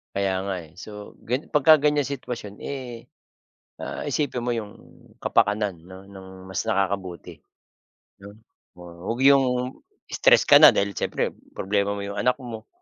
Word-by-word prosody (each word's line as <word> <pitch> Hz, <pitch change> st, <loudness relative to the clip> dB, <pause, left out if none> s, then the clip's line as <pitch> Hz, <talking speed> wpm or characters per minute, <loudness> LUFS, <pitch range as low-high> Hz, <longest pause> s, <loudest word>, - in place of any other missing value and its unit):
Kaya 100 Hz, -1 st, 0 dB
nga, 100 Hz, -1 st, -3 dB
eh. -, -, -22 dB
So 105 Hz, +1 st, -10 dB
gan 125 Hz, +6 st, -2 dB
pagka-ganyan 150 Hz, -1 st, +4 dB
sitwasyon, 120 Hz, -7 st, -6 dB
eh, 125 Hz, -4 st, -7 dB, 0.7 s
ah, -, -, -5 dB
isipin 130 Hz, -5 st, -2 dB
mo 120 Hz, -, 0 dB
'yong 105 Hz, -3 st, -4 dB, 0.4 s
kapakanan 105 Hz, -4 st, 0 dB
ng 95 Hz, +3 st, -13 dB
ng 95 Hz, -1 st, -11 dB, 0.2 s
mas 95 Hz, 0 st, -3 dB
nakakabuti, 95 Hz, -3 st, -2 dB, 0.8 s
'no? 100 Hz, +1 st, -12 dB, 0.4 s
Wa 90 Hz, -1 st, -12 dB, 0.2 s
huwag 120 Hz, +4 st, -1 dB
'yong 130 Hz, -2 st, +4 dB, 0.5 s
tress -, -, +6 dB
ka -, -, +7 dB
na, -, -, +11 dB
dahil 100 Hz, 0 st, +1 dB
siyempre, -, -, -2 dB, 0.2 s
problema 100 Hz, +1 st, 0 dB
mo 100 Hz, -, -5 dB
'yong 100 Hz, 0 st, -4 dB
anak 125 Hz, 0 st, +2 dB
mo, 115 Hz, -4 st, -9 dB
105 Hz, 145 wpm, -24 LUFS, 100-125 Hz, 0.8 s, na